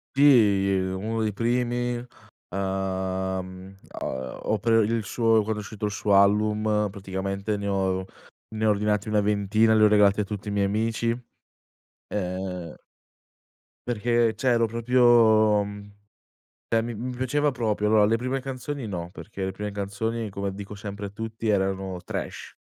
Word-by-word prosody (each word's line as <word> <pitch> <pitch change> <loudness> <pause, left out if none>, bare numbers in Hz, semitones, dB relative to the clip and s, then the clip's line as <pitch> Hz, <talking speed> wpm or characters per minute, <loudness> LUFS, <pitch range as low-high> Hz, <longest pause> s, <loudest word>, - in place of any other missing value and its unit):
Sì, 110 -9 +5
ehm, 95 -1 0
uno 110 0 -1
dei 105 - -1
primi, 120 +2 0 0.5
uhm, 95 0 -3
a 65 0 -5
o 110 - 0
per 115 +1 +3
il 115 +1 0
suo 115 +1 +2
quando 110 +1 -2
è - - -7
uscito 105 +1 -5
il 105 - -1
suo 100 0 +1
album 105 +1 +2
praticamente, 100 +2 -3
ne 100 0 -4
ho 95 -1 0 0.4
ne 110 0 -2
ho - - +5
ordinati 105 0 +1
una 105 -1 +2
ventina 105 +2 +2
e - - +4
li 110 - +4
ho 105 - +8
regalati 105 -1 +4
a 105 - +2
tutti 105 +1 -6
i - - -3
miei 100 -1 +1
amici, 115 +3 0 0.9
ehm 90 -3 -4 1.1
Perché, 120 0 +1
cioè 130 - -3
ero 115 -1 +3
proprio, 115 +3 +1 0.6
uhm, 100 0 -6 0.8
cioè 115 -1 +2
mi 120 +1 -4
mi 125 +3 -5
piaceva 145 +4 +1
proprio. 110 -5 -1
Allora, 105 -1 +5
le 110 +2 +3
prime 130 +3 -2
canzoni 135 0 -5
no, 85 -3 -5
perché 100 +1 -7
le 95 - -1
prime 105 +2 -5
canzoni 105 +2 -3
come 100 0 -4
dico 100 +1 -8
sempre 100 0 -6
a - - -5
tutti 110 +1 -5
erano 95 -2 0
trash. - - -6
105 Hz, 160 wpm, -25 LUFS, 100-115 Hz, 1.1 s, ho